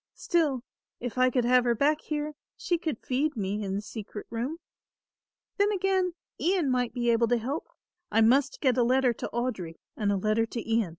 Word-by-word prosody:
Still 295 -8 +1 0.4
if 245 -1 -5
I 255 0 +5
could 250 -1 +1
have 250 0 +5
her 240 -1 +2
back 295 +6 +2
here, 300 0 -3 0.2
she 345 -2 0
could 315 -8 -2
feed 275 +2 0
me 205 +1 -2
in 195 -1 -2
the 205 - -3
secret 210 -1 -7
room. 245 +8 -3 1.0
"Then 405 +1 +3
again 380 -2 +1 0.2
Ian 345 -6 +2
might 250 -2 +1
be 240 -1 +2
able 230 0 +3
to 240 +1 +3
help 265 +7 -4 0.4
I 225 +2 +4
must 270 +5 +3
get 260 -3 +3
a - - +5
letter 255 0 +3
to - - -5
Audry 220 -9 -3 0.2
and 205 -2 0
a 200 - +1
letter 215 +3 +1
to 230 0 -5
Ian." 225 -4 +2
245 Hz, 195 wpm, -28 LUFS, 225-295 Hz, 1.0 s, I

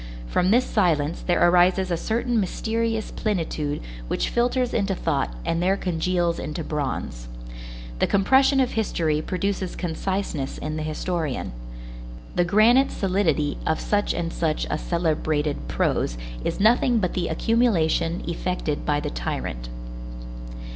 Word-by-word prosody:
From 180 - +1
this 245 +5 +4
silence 165 -6 +1
there 175 -1 +3
arises 180 +1 +4
a - - +3
certain 230 +6 0
mysterious 225 +3 -1
plenitude 160 -8 -2 0.3
which - - -1
filters 245 +1 +1
into 195 -3 +1
thought 145 - 0
and 165 - 0
there 190 +2 +2
congeals 175 -1 0
into 155 +2 -4
bronze. 135 - -3 0.7
The - - +3
compression 265 +7 +4
of 255 -2 +2
history 160 -8 0
produces 190 +1 -2
conciseness 175 -4 -2
in 155 0 -4
the 155 - -3
historian. 155 - -2 0.8
The 175 - +2
granite 225 +8 +5
solidity 175 -7 0
of 160 - +1
such 205 0 0
and 170 -1 -2
such 155 -2 0
a 150 - 0
celebrated 155 - -1
prose - - 0 0.3
is - - -2
nothing 235 +3 +4
but 185 -5 0
the 175 -2 -1
accumulation 170 -4 +1
effected 170 -3 -2
by 145 0 +2
the - - -3
tyrant. - - -4
175 Hz, 135 wpm, -24 LUFS, 155-205 Hz, 0.8 s, granite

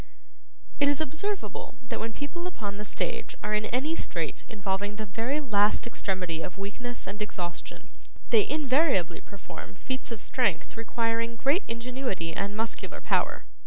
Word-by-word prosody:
It 285 - +6
is 285 -1 +4
observable 315 - -2
that - - -1
when 225 +1 -1
people 345 +8 -3
upon 205 - -4
the 210 - -4
stage - - -1
are 210 +1 0
in 210 0 +3
any 270 +8 +1
strait - - -1
involving 205 -1 -1
the 215 0 -3
very 230 +9 0
last 210 -7 +4
extremity 185 -7 -1
of 180 +3 -4
weakness 235 +5 -4
and 200 +2 -4
exhaustion, 175 -4 -4 0.4
they 220 -3 +6
invariably 270 - +3
perform 200 -1 -9
feats 260 +6 -3
of 230 - -3
strength 250 +5 +1
requiring 230 0 +1
great 275 - +4
ingenuity 235 -8 -1
and 205 +1 -1
muscular 225 0 -2
power. - - +2
225 Hz, 150 wpm, -30 LUFS, 200-265 Hz, 0.4 s, It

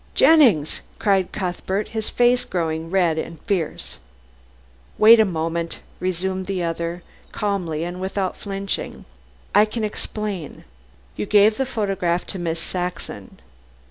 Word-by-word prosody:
"Jennings!" 240 - +5 0.2
cried 195 -3 +2
Cuthbert, 190 +1 -2
his 220 -1 -3
face 245 +1 +3
growing 165 -2 -2
red 175 -4 +2
and 165 0 -6
fierce. 180 -6 -2 1.0
"Wait 225 +2 +8
a 220 - +6
moment," 165 -2 -2 0.2
resumed 185 +1 -2
the 190 -3 -1
other 170 +1 -3 0.3
calmly 180 -7 -2
and 175 +2 -5
without 190 0 -2
flinching. 195 -1 -4 0.5
"I 210 +2 +6
can 215 +1 -4
explain. 210 -5 -4 0.5
You 105 - -3
gave 210 +1 +5
the 265 - 0
photograph 195 -7 -1
to 190 - -5
Miss 165 -1 -2
Saxon. 175 - -5
185 Hz, 125 wpm, -22 LUFS, 170-210 Hz, 1.0 s, Wait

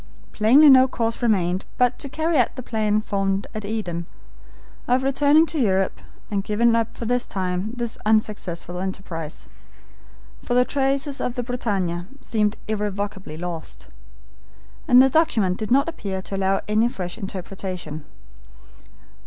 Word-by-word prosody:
Plainly 255 +8 +6
no 260 -2 +8
course 230 -2 -2
remained 190 -5 +1
but 250 0 +2
to 280 - -4
carry 315 +4 -1
out 245 - +1
the 255 - -6
plan 215 -2 0
formed 195 -1 -1
at 215 - -5
Eden, 180 -6 -3 0.8
of 250 +1 +2
returning 285 +3 +4
to 320 -1 -3
Europe 190 -5 +1 0.3
and 200 -1 0
giving 230 +3 +2
up 230 -1 -1
for 235 - -5
the 245 +2 +2
time 185 -3 -3
this 240 -2 -4
unsuccessful 205 -5 -1
enterprise, 180 -4 -6 0.9
for 245 - -2
the 250 0 +5
traces 275 +1 -1
of 245 - -2
the 245 - -2
BRITANNIA 195 -8 -2
seemed 215 -4 0
irrevocably 205 -5 -3
lost, 160 - -7 1.0
and 250 +1 +8
the - - +5
document 225 - +2
did 215 - -4
not 275 +4 +4
appear 200 -12 -4
to 195 - -5
allow 195 0 +1
any 215 +3 +3
fresh 180 -6 -6
interpretation. 185 -5 -6
215 Hz, 145 wpm, -23 LUFS, 190-245 Hz, 1.0 s, no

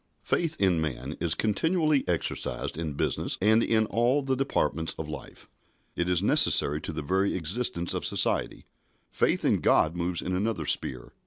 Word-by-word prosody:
Faith 165 -2 -1
in 90 -5 +2
man 70 -1 -4
is 80 -2 0
continually 155 - +1
exercised 85 -2 -2
in 80 -2 -4
business 70 - -2
and 110 +3 +4
in 110 -1 +2
all 120 +7 +1
the 135 -1 0
departments 80 - -1
of 80 - -5
life. 75 -3 -9 0.5
It 85 +1 -1
is 90 0 +1
necessary 100 - +4
to - - -5
the 75 -1 -5
very 95 +6 0
existence 85 0 -2
of - - -3
society. - - 0 0.5
Faith - - 0
in - - +2
God 80 +2 +2
moves 85 0 -2
in 90 - -2
another 105 +4 -2
sphere. 60 -2 -3
90 Hz, 165 wpm, -27 LUFS, 80-115 Hz, 0.5 s, and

